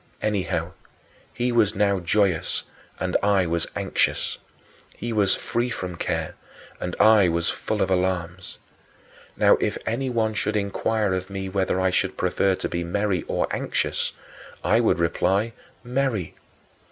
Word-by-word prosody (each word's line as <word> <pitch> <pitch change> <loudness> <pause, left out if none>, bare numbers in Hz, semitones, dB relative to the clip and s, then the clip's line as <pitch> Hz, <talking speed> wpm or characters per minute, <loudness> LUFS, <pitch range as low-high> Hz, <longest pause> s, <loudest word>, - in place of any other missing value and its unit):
Anyhow, 105 -3 -1 0.6
he 125 +1 -1
was 110 -3 +3
now 100 -1 +2
joyous 90 -1 +1 0.4
and 90 -1 -2
I 100 -2 +3
was 85 -1 -1
anxious. - - 0 0.6
He 120 +1 -3
was 100 -3 +4
free 120 +1 -1
from 90 -7 -4
care, - - -2 0.5
and 90 - -3
I 110 -4 +6
was 85 0 0
full - - -1
of 95 - -2
alarms. 90 -1 -1 0.8
Now, - - +5
if - - -1
anyone 115 -2 0
should 110 - -1
inquire 105 0 0
of 95 +1 -3
me 95 -1 -4
whether 95 -1 0
I 95 0 +2
should - - 0
prefer 95 -1 +2
to - - -3
be 85 0 -2
merry 95 +1 0
or - - +1
anxious, - - -1 0.5
I 110 - +4
would 115 - +3
reply, 95 +6 +1 0.3
"Merry." 125 - -1
100 Hz, 140 wpm, -24 LUFS, 90-110 Hz, 0.8 s, I